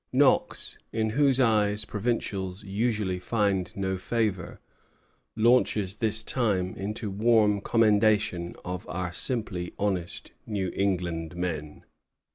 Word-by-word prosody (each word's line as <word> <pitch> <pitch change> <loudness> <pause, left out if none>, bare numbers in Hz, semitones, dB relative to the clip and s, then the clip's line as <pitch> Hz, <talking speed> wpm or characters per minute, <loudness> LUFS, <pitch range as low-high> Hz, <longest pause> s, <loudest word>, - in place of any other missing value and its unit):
Knox, - - +2
in 110 -1 0
whose 135 +1 +3
eyes 105 -3 +2
provincials 100 -4 -3
usually 105 -2 -1
find 100 -3 0
no 95 -1 -2
favor, 105 -4 -2 0.8
launches 110 -4 +3
this 110 -1 +1
time 100 -8 0
into 105 +1 -4
warm 105 -1 +3
commendation 105 -5 +2
of 90 0 -5
"our 90 -1 -3
simply 95 -7 -2
honest 95 -4 -3 0.2
New 100 -5 -2
England 90 -4 -1
men." 80 -4 -4
100 Hz, 105 wpm, -27 LUFS, 90-110 Hz, 0.8 s, whose